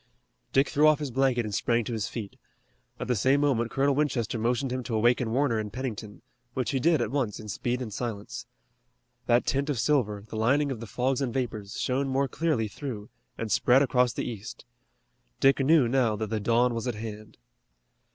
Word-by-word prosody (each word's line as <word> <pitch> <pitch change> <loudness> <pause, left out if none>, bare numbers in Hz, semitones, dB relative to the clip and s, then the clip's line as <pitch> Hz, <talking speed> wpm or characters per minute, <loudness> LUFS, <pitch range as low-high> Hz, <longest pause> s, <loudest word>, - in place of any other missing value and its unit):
Dick 135 +1 +3
threw 150 +2 +4
off 155 -1 +5
his 145 -3 -4
blanket 130 -2 +1
and 105 - -5
sprang 115 +3 +1
to 120 - -5
his 105 -4 -2
feet. 105 -4 -6 0.6
At - - -4
the 125 - +1
same 130 +7 +3
moment 120 -5 +1
Colonel 140 +3 +2
Winchester 130 -6 0
motioned 125 +3 0
him 130 0 -2
to 115 - -2
awaken 120 +1 +2
Warner 125 -1 +1
and 105 -1 -4
Pennington, 110 -4 -6 0.3
which 130 -2 -1
he 135 - 0
did 160 +3 +3
at 110 - -4
once 130 -7 -1
in 110 - -9
speed 125 +4 -2
and 110 -4 -7
silence. 105 -3 -5 0.8
That 120 +1 +3
tint 140 +2 0
of 145 - 0
silver, 110 -8 +1
the 110 - -6
lining 140 +6 +2
of 125 - -4
the 115 - -7
fogs 130 +5 0
and 130 -3 -1
vapors, 115 -4 -4
shone 135 +1 0
more 135 +1 +1
clearly 135 -6 0
through, 110 -1 -7 0.3
and 110 -2 -4
spread 130 +7 +4
across 125 -2 +2
the - - -4
East. 110 0 -7 0.7
Dick 135 +1 +4
knew 140 -1 +4
now 120 -3 +2
that 110 0 -4
the 110 - 0
dawn 120 +3 +2
was 115 +1 -3
at 120 - -2
hand. 110 -1 -8
125 Hz, 200 wpm, -27 LUFS, 110-135 Hz, 0.8 s, off